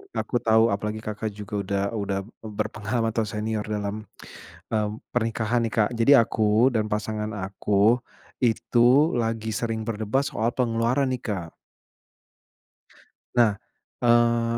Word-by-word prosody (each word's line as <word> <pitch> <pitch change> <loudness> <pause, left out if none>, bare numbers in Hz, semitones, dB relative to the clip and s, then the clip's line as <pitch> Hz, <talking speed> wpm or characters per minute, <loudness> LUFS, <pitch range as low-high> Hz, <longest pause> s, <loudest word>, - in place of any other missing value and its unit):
aku 120 - -1
tahu 110 -1 +4
apalagi 105 +2 -3
Kakak 110 0 -4
juga 105 0 -5
udah 100 0 -1
udah 100 -3 -2 0.2
berpengalaman 110 +1 -2
atau 110 -1 -1
senior 105 +1 -3
dalam, 105 0 -4 0.6
mmm, 105 -1 0 0.2
pernikahan 115 0 0
nih 110 - -7
Kak. 105 -2 +3
Jadi 115 +4 +3
aku 110 +1 +3
dan 110 -1 +1
pasangan 105 0 -2
aku, 100 +3 +2 0.4
itu 120 +6 +4
lagi 115 -1 -1
sering 115 -1 -2
berdebat 110 +4 0
soal 115 +2 -1
pengeluaran 125 +2 +1
nih 125 - -2
Kak. 90 -7 -4 1.8
Nah, 115 -4 +4 0.5
eee, 120 0 +3
110 Hz, 125 wpm, -25 LUFS, 105-115 Hz, 1.8 s, tahu